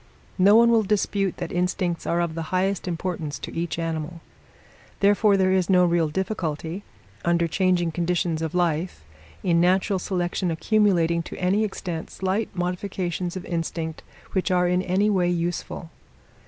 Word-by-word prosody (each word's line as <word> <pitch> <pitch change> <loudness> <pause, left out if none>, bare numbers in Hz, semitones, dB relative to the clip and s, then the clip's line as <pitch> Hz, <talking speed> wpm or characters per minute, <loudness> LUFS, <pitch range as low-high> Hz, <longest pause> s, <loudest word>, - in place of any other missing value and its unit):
No 200 +3 +6
one 235 +1 +6
will 230 -1 +5
dispute 200 -2 0
that 175 -1 -5
instincts 180 -1 -1
are 170 +1 +1
of 170 -2 -1
the 165 - -4
highest 190 +1 0
importance 165 -3 -3
to - - -8
each 165 0 -2
animal. 165 0 -3 0.8
Therefore, 205 0 +4
there 185 -1 +3
is 185 -1 +1
no 180 -1 +5
real 170 -2 +2
difficulty, 170 -1 -3 0.4
under 170 0 +2
changing 175 0 +1
conditions 170 -1 -1
of 160 +1 -3
life, 170 - 0 0.4
in 170 -2 +3
natural 190 +2 +2
selection 180 0 -1
accumulating 170 -2 +2
to - - -8
any 190 +4 +2
extent 175 -5 -4
slight 190 +4 -1
modifications 180 0 -3
of 185 - -7
instinct 165 -1 -3 0.3
which 190 +1 0
are 180 -1 +3
in 180 +1 +2
any 190 +3 +1
way 180 -3 +2
useful. 170 -1 -3
180 Hz, 155 wpm, -24 LUFS, 170-190 Hz, 0.8 s, No